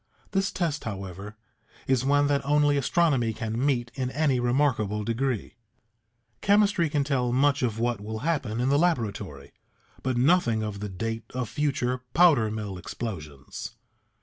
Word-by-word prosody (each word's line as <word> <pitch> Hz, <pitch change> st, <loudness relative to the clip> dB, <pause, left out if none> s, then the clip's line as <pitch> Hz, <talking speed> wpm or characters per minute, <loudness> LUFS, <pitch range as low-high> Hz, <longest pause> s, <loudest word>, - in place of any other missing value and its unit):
This 195 Hz, -1 st, +1 dB
test, 165 Hz, -5 st, -2 dB
however, 100 Hz, 0 st, -6 dB, 0.5 s
is 130 Hz, -2 st, +2 dB
one 145 Hz, +1 st, +3 dB
that 145 Hz, -1 st, +1 dB
only 145 Hz, +1 st, +3 dB
astronomy 140 Hz, -5 st, +2 dB
can 115 Hz, +3 st, -3 dB
meet 120 Hz, -4 st, 0 dB
in 130 Hz, -2 st, -2 dB
any 140 Hz, -2 st, +1 dB
remarkable 120 Hz, -5 st, +1 dB
degree. 115 Hz, 0 st, -2 dB, 0.8 s
Chemistry 200 Hz, -4 st, +3 dB
can 145 Hz, -1 st, +1 dB
tell 130 Hz, -4 st, 0 dB
much 140 Hz, +3 st, +2 dB
of 115 Hz, -4 st, 0 dB
what 120 Hz, -2 st, -1 dB
will 110 Hz, +1 st, -5 dB
happen 135 Hz, -9 st, -1 dB
in 125 Hz, +2 st, +1 dB
the 140 Hz, +1 st, +3 dB
laboratory, 100 Hz, -, -1 dB, 0.5 s
but 130 Hz, -2 st, -1 dB
nothing 120 Hz, -5 st, +3 dB
of 105 Hz, -2 st, -4 dB
the 105 Hz, 0 st, -4 dB
date 115 Hz, +4 st, -4 dB
of 125 Hz, -3 st, -2 dB
future 130 Hz, -4 st, -1 dB
powder 150 Hz, -10 st, +5 dB
mill 105 Hz, -3 st, -5 dB
explosions. 75 Hz, -, -7 dB
125 Hz, 150 wpm, -26 LUFS, 110-145 Hz, 0.8 s, powder